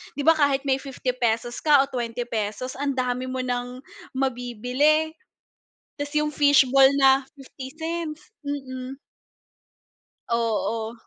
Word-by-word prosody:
di 285 Hz, -, -3 dB
ba 325 Hz, -, +7 dB
kahit 280 Hz, -2 st, +2 dB
may 270 Hz, -1 st, +1 dB
₱50 245 Hz, -3 st, -2 dB
ka 290 Hz, -3 st, +5 dB
o 275 Hz, -, -7 dB
₱20 235 Hz, -1 st, -3 dB
ang 280 Hz, -2 st, -1 dB
dami 250 Hz, 0 st, -1 dB
mo 255 Hz, 0 st, -3 dB
ng 250 Hz, +1 st, -4 dB, 0.3 s
mabibili. 260 Hz, +5 st, +1 dB, 0.9 s
Tas 290 Hz, 0 st, -4 dB
yung 300 Hz, 0 st, +1 dB
fish 285 Hz, -1 st, +5 dB
ball 270 Hz, -1 st, +7 dB
na 270 Hz, 0 st, +5 dB
¢50 315 Hz, +6 st, -6 dB, 0.2 s
mm. 265 Hz, -2 st, -5 dB, 1.3 s
Oo. 230 Hz, -1 st, -1 dB
265 Hz, 115 wpm, -24 LUFS, 245-285 Hz, 1.3 s, ba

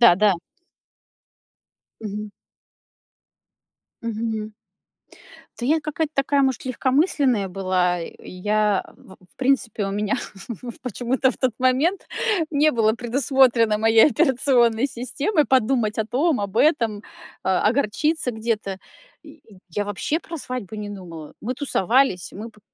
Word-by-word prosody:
Да 235 Hz, -7 st, +8 dB
да. 205 Hz, -2 st, +4 dB, 1.7 s
Мгм. 210 Hz, -1 st, -5 dB, 1.7 s
Мгм. 220 Hz, -1 st, -3 dB, 1.1 s
Да 240 Hz, -, -2 dB
я 315 Hz, +3 st, +3 dB
какая-то 305 Hz, 0 st, -3 dB
такая, 275 Hz, 0 st, +2 dB
может, 265 Hz, -3 st, 0 dB
легкомысленная 260 Hz, -, +1 dB
была. 180 Hz, -1 st, 0 dB
И 165 Hz, -, -9 dB
я, 210 Hz, +2 st, +1 dB
в 190 Hz, -, -16 dB, 0.2 s
в -, -, -36 dB
принципе, 260 Hz, -5 st, 0 dB
у -, -, -3 dB
меня 205 Hz, +1 st, -1 dB, 0.5 s
в 240 Hz, -2 st, -7 dB
почему-то 250 Hz, +2 st, 0 dB
в -, -, -8 dB
тот 255 Hz, -2 st, 0 dB
момент 265 Hz, +9 st, +1 dB, 0.4 s
не 305 Hz, 0 st, +3 dB
было 225 Hz, -5 st, +2 dB
предусмотрено 240 Hz, -2 st, +2 dB
моей 225 Hz, +1 st, +6 dB
операционной 250 Hz, -4 st, +3 dB
системой 285 Hz, -, -1 dB
подумать 240 Hz, -4 st, +1 dB
о 220 Hz, -, 0 dB
том, 270 Hz, +3 st, +1 dB
об 200 Hz, 0 st, -4 dB
этом, 230 Hz, -8 st, +2 dB, 0.4 s
а, 190 Hz, -1 st, +1 dB
огорчиться 280 Hz, +5 st, +1 dB
где-то. 220 Hz, -4 st, -3 dB, 0.4 s
Я -, -, -14 dB, 0.3 s
я 205 Hz, +5 st, -2 dB
вообще 205 Hz, +10 st, -2 dB
про 330 Hz, -, -7 dB
свадьбу 250 Hz, -, -6 dB
не 210 Hz, -1 st, -5 dB
думала. 170 Hz, -6 st, -9 dB
Мы 250 Hz, +4 st, -3 dB
тусовались, 250 Hz, -, +1 dB
мы 220 Hz, +4 st, -8 dB
по 215 Hz, -, -23 dB
230 Hz, 125 wpm, -23 LUFS, 210-270 Hz, 1.7 s, Да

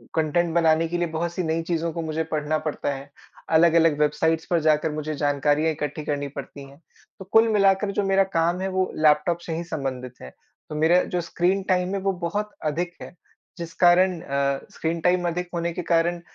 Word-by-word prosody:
Content 165 Hz, +1 st, +1 dB
बनाने 165 Hz, -1 st, +3 dB
के 175 Hz, +1 st, -2 dB
लिए 175 Hz, 0 st, 0 dB
बहुत 165 Hz, +1 st, -3 dB
सी 180 Hz, -, -2 dB
नई 160 Hz, +1 st, -1 dB
चीज़ों 170 Hz, -1 st, -2 dB
को 170 Hz, -, -3 dB
मुझे 160 Hz, 0 st, -2 dB
पढ़ना 155 Hz, 0 st, 0 dB
पड़ता 145 Hz, -1 st, -2 dB
है। 140 Hz, +1 st, -9 dB, 0.4 s
अलग-अलग 165 Hz, -1 st, +4 dB
वेबसाइट्स 160 Hz, +2 st, +1 dB
पर 170 Hz, -, +3 dB
जाकर 155 Hz, 0 st, +2 dB
मुझे 155 Hz, 0 st, -4 dB
जानकारियाँ 145 Hz, +2 st, +1 dB
इकट्ठी 150 Hz, 0 st, -4 dB
करनी 145 Hz, -1 st, -2 dB
पड़ती 140 Hz, 0 st, -9 dB
हैं। 140 Hz, +4 st, -18 dB, 0.4 s
तो 190 Hz, -, -9 dB
कुल 225 Hz, +1 st, +6 dB
मिलाकर 200 Hz, 0 st, +3 dB
जो -, -, +2 dB
मेरा 195 Hz, 0 st, +3 dB
काम 170 Hz, +3 st, +1 dB
है 190 Hz, -, -1 dB
वो 185 Hz, 0 st, -1 dB
लैपटॉप 155 Hz, +2 st, +3 dB
से 165 Hz, -, -4 dB
ही 170 Hz, -, -3 dB
संबंधित 130 Hz, -6 st, -5 dB
है। 65 Hz, -, -10 dB, 0.4 s
तो 150 Hz, -, -6 dB
मेरा 165 Hz, +4 st, +4 dB
जो 175 Hz, -, +1 dB
स्क्रीन 185 Hz, +3 st, 0 dB
टाइम 180 Hz, +1 st, +1 dB
है -, -, -1 dB
वो 195 Hz, 0 st, +1 dB, 0.2 s
बहुत 210 Hz, +4 st, -3 dB, 0.2 s
अधिक 175 Hz, +3 st, -3 dB
है। 175 Hz, -, -10 dB, 0.4 s
जिस 170 Hz, 0 st, -7 dB
कारण 175 Hz, 0 st, +5 dB
अ, 140 Hz, 0 st, -1 dB
स्क्रीन 165 Hz, +1 st, -2 dB
टाइम 180 Hz, 0 st, +2 dB
अधिक 175 Hz, +1 st, -3 dB
होने 170 Hz, 0 st, -1 dB
के 180 Hz, -, -4 dB
कारण 170 Hz, +1 st, +1 dB
165 Hz, 200 wpm, -24 LUFS, 150-175 Hz, 0.4 s, कुल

